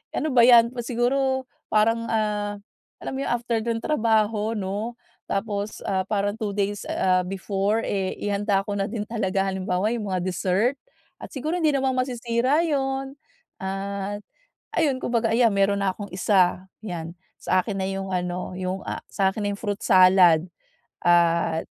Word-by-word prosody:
ano 310 -1 -1
ba 235 - +7
yan, 235 -1 +7
pu 255 - -8
siguro 260 +2 0 0.2
parang 225 +2 +2
ah 210 -2 -1 0.4
alam - - -5
mo 265 - -3
yun, - - -2
after 235 -1 0
nung 230 -1 -1
trabaho 220 -5 +1
'no? 205 +4 -3 0.3
Tapos 205 0 -3
ah 190 -1 +1
parang 205 0 0
2 215 -3 -3
days 205 0 -1
ah 185 -1 +2
before, 195 +3 -1
eh, 190 -2 -1
ihanda 200 -1 0
ko 205 - -2
na 200 - 0
din 215 -3 -2
talaga. 195 -4 -1
Halimbawa 190 +3 -1
yung 210 -4 -4
mga 185 - 0
dessert 190 +7 +1 0.4
at - - -9
siguro 305 +5 -3
hindi 320 -4 +2
naman 265 -2 0
masisira 255 +4 +1
yun. 270 -2 -1 0.4
At 200 +1 -4 0.6
ayun, 285 -6 +2
kung 245 - -3
baga, 225 -1 +2
ayan 235 -1 +4
meron 200 0 +2
na 195 - +2
akong 205 -1 -8
isa, 185 -1 +2 0.2
1 - - -9
yan. 170 -4 -4 0.3
Sa 185 - +2
akin 215 - -3
na 190 - -1
yung 195 0 -4
ano, 180 0 -2
yung 185 +1 -4
ah - - -4
sa 190 -1 +1
akin 215 - -6
na - - +1
yung - - -10
fruit 205 -2 -3
salad 185 -3 +6 0.6
at 170 -1 +3
205 Hz, 170 wpm, -24 LUFS, 190-235 Hz, 0.6 s, ba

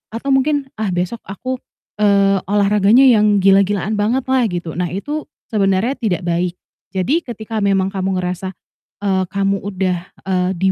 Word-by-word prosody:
atau 275 +4 -4
mungkin, 270 0 +1
"Ah, 195 -5 -1
besok 180 +6 -2
aku, 255 +7 -4 0.4
eee, 200 -2 +4
olahraganya 205 +4 +4
yang 210 -6 +4
gila-gilaan 200 +1 +3
banget 240 +5 +1
lah" 255 -3 +3
gitu. 175 -4 -4
Nah 180 - 0
itu 290 - -4 0.2
sebenarnya 205 +5 +1
tidak 200 -7 -1
baik, 175 +1 -1 0.4
jadi 190 - +1
ketika 225 -6 -5
memang 195 -1 +1
kamu 190 -1 -1
ngerasa, 185 +1 -4 0.5
eee, 190 -2 +1
kamu 195 +1 0
udah, 185 -2 -2 0.2
eee, 185 -1 0
di 190 +2 +2
200 Hz, 150 wpm, -18 LUFS, 190-220 Hz, 0.5 s, eee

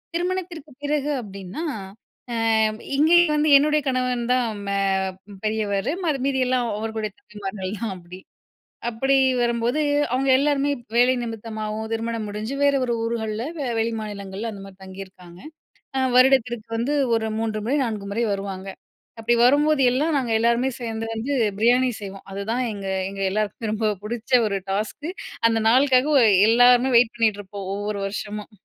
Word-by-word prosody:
திருமணத்திற்கு 350 -4 -3
பிறகு 295 0 -1
அப்டின்னா, 195 - -7 0.7
அ - - -2 0.6
இங்கேயும் 320 +2 +5
வந்து 300 0 +2
என்னுடைய 300 +1 +2
கணவன் 250 -2 -1
தான் 250 -1 +2 0.2
மே 200 0 0 0.7
பெரியவரு. 215 +2 -1
மரு 290 -4 0
மீதி 275 -1 0
எல்லாம் 250 -2 +1
அவருடைய 220 -1 -3
தம்பிமார்கள் 200 -1 -6
தான் 220 -4 -3
அப்டி. 180 +1 -12 0.7
அப்படி 270 +4 0 0.3
வரும்போது, 240 +4 0 0.3
அவுங்க 265 +1 +1
எல்லாருமே 285 0 +1 0.3
வேலை 250 +2 +5
நிமித்தமாவும், 220 -1 -5
திருமணம் 225 -1 -2
முடிஞ்சு, 215 +5 -4
வேற 285 0 +4
ஒரு 240 - -1
ஊர்கள்ல 225 0 -2 0.3
வெளி 225 +1 +1
மாநிலங்கள்ல 205 +1 -5
அந்த 195 -1 -9
மாரி 195 -1 -13
தங்கியிருக்காங்க. 185 -2 -11 0.6
அ - - +1 0.2
வருடத்திற்கு 245 -3 +3
வந்து 255 +6 -1 0.2
ஒரு 220 0 -1
3 220 -1 -2
முறை, 280 +4 +1
4 210 -4 -4
முறை 235 +3 0
வருவாங்க. 195 -1 -5 0.5
அப்படி 235 +1 +2
வரும்போது, 295 +3 +4
எல்லாம் 295 +4 +1
நாங்க 240 -4 -2
எல்லாருமே 235 +3 +2
சேந்து 225 -1 -4
வந்து 245 +6 -2 0.2
பிரியாணி 250 +3 +3
செய்வோம். 195 -1 -9
அதுதான் 220 +6 -2
எங்க 200 -1 -6 0.2
எங்க 195 0 -8
எல்லாருக்கும் 215 +1 -2
ரொம்ப 215 -1 0
புடிச்ச 240 +3 -6 0.2
1 200 -1 -1
டாஸ்க்கு. 220 - -3 0.4
அந்த 225 0 +1
நாளுக்காகவே 260 +1 +4 0.2
எல்லாருமே 245 +2 +5
வெயிட் 240 0 +4
பண்ணிகிட்டு 215 -3 +1
இருப்போம் 195 -1 -8
ஒவ்வொரு 205 0 -3
வருஷமும். 210 +2 -6
230 Hz, 140 wpm, -23 LUFS, 210-260 Hz, 0.7 s, இங்கேயும்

